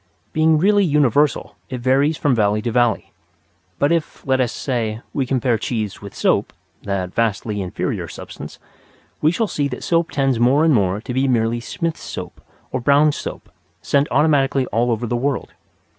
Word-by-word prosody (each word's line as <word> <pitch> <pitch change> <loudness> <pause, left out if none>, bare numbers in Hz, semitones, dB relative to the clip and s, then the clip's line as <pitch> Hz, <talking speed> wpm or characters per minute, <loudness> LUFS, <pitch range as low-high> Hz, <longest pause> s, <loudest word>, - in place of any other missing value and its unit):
Being 160 0 +4
really 200 +5 +4
universal 150 - +2
it 130 - -4
varies 135 +5 +2
from 145 - +2
valley 105 -2 +2
to 120 - -1
valley. 120 -2 +1 0.6
But 145 +3 +2
if, 165 -2 -2
let 130 -1 +2
us 120 -2 0
say, 115 -4 -2
we 135 -3 -1
compare 125 -3 +1
cheese 110 -3 -3
with 100 -1 -10
soap - - +1 0.3
(that 95 -2 -3
vastly 105 -2 -1
inferior 90 -2 -3
substance), - - -9 0.6
we 155 - +4
shall 225 +6 0
see 145 -8 -1
that 125 -2 -6
soap 165 -1 +1
tends 135 -4 0
more 135 +6 +4
and 160 - +4
more 100 -3 +1
to 125 - -5
be 130 +2 +1
merely 120 -2 +1
Smith's 165 +7 -4
Soap - - -7 0.3
or 130 - -2
Brown's 145 +3 +4
Soap, - - -7 0.3
sent 140 +1 +2
automatically 140 -3 +2
all 120 +3 +1
over 115 0 -1
the 120 - -1
world. 135 +2 -2
130 Hz, 175 wpm, -20 LUFS, 115-145 Hz, 0.6 s, Being